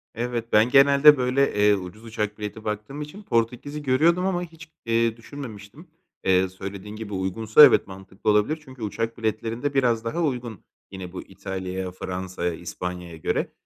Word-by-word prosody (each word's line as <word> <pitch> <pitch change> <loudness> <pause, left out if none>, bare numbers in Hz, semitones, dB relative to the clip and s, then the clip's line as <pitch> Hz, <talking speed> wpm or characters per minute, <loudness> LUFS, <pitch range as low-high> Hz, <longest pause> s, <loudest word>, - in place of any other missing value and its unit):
Evet, 120 0 -3
ben 110 +3 +5
genelde 140 +2 +7
böyle, 130 +2 +1
eee, 105 0 +4
ucuz 95 +3 -8
uçak 105 -2 -3
bileti 105 +1 -6
baktığım 105 +7 -4
için 150 +8 -9
Portekiz’i 125 - -1
görüyordum 160 +7 +3
ama 180 -2 0
hiç, 165 -1 -12 0.2
eee, 115 0 +1
düşünmemiştim. 115 - -10 0.4
Eee, 95 0 +3
söylediğin 100 +2 -8
gibi 110 -1 -7
uygunsa 105 +8 +6
evet, - - +3
mantıklı 95 +1 -5
olabilir 105 +10 +2
çünkü 130 -3 -13
uçak 115 +2 -3
biletlerinde 115 +5 -2
biraz 120 -4 +2
daha 170 +10 -1
uygun 120 - -3 0.3
yine 95 -2 -7
bu - - -5
İtalya’ya, 95 -1 -5
Fransa’ya, 90 -1 -4
İspanya’ya 90 0 -6
göre. 80 - -1
110 Hz, 155 wpm, -24 LUFS, 95-135 Hz, 0.4 s, genelde